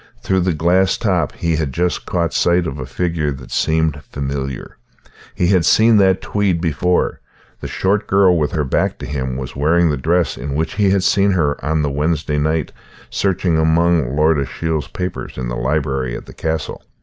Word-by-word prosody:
Through 95 - +1
the 90 -1 +1
glass 90 +4 +2
top 90 - 0
he 85 -2 -1
had 75 -4 -2
just 90 +4 -1
caught 85 -2 -1
sight 85 0 +2
of 75 -2 -5
a 65 - -5
figure 80 0 -1
that 65 -2 -11
seemed 80 -1 0
familiar. 70 -2 -4 0.6
He 90 - +1
had 95 -4 +3
seen 110 +6 +5
that 95 -2 +3
tweed 100 -4 0
before; 90 +2 0 0.4
the - - -6
short 100 +3 0
girl 95 -2 +4
with 75 -3 0
her 75 -3 0
back 65 - 0
to - - -7
him 65 -3 -3
was 65 -2 -6
wearing 80 +4 +2
the 75 - -1
dress 85 +6 0
in 70 0 -4
which 80 +2 -1
he 100 -2 +2
had 95 -1 +2
seen 100 +1 +3
her 75 -7 0
on 75 +1 0
the 75 - -1
Wednesday 75 +1 -1
night, 80 0 0 0.4
searching 90 -4 0
among 80 -4 +2
Lord 75 0 +3
Ashiel's 75 +2 -2
papers 90 -1 -5
in 65 -2 -3
the - - -3
library 65 -2 -1
at - - -10
the - - -12
castle. 80 -2 -3
80 Hz, 190 wpm, -18 LUFS, 70-90 Hz, 0.6 s, seen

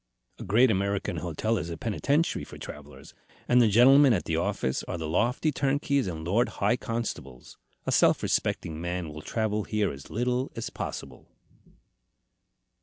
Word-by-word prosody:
A - - -6
great 115 +6 +4
American 100 -1 -1
hotel 90 +8 -1
is 85 - -5
a 85 - -5
penitentiary 140 - 0
for - - -10
travellers, - - -11 0.3
and 125 0 +5
the 115 - +5
gentlemen 130 +5 +6
at 95 - -1
the 80 - -1
office 85 -6 -1
are 90 - -4
the 80 -2 -4
lofty 120 - +1
turnkeys 140 -2 0
and 80 -3 -5
lord 110 +8 +2
high 120 - +2
constables. 115 - -6 0.3
A - - -1
self - - +4
respecting 80 0 -1
man 85 -1 -3
will 75 0 -8
travel 110 +3 -1
here 105 -2 0
as 70 0 -11
little 125 +3 -1
as - - -5
possible." 65 -2 -7
105 Hz, 160 wpm, -27 LUFS, 85-125 Hz, 0.3 s, gentlemen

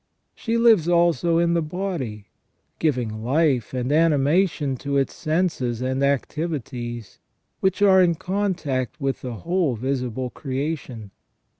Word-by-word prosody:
She 230 0 -2
lives 225 -8 +5
also 170 -1 +3
in 170 0 +2
the 170 - +2
body, 155 - -4 0.5
giving 120 -8 -1
life 135 -2 +1
and 125 +1 -2
animation 150 -1 +2
to 140 +2 -2
its 135 - 0
senses 155 -8 -1
and 130 +1 -1
activities, 135 -5 -3 0.4
which 190 +1 +1
are 190 -2 +6
in 170 -2 +3
contact 170 - -2
with 135 -2 -2
the 125 -2 -5
whole 170 - 0
visible 125 0 -3
creation. 135 -6 -4
145 Hz, 125 wpm, -23 LUFS, 125-170 Hz, 0.5 s, are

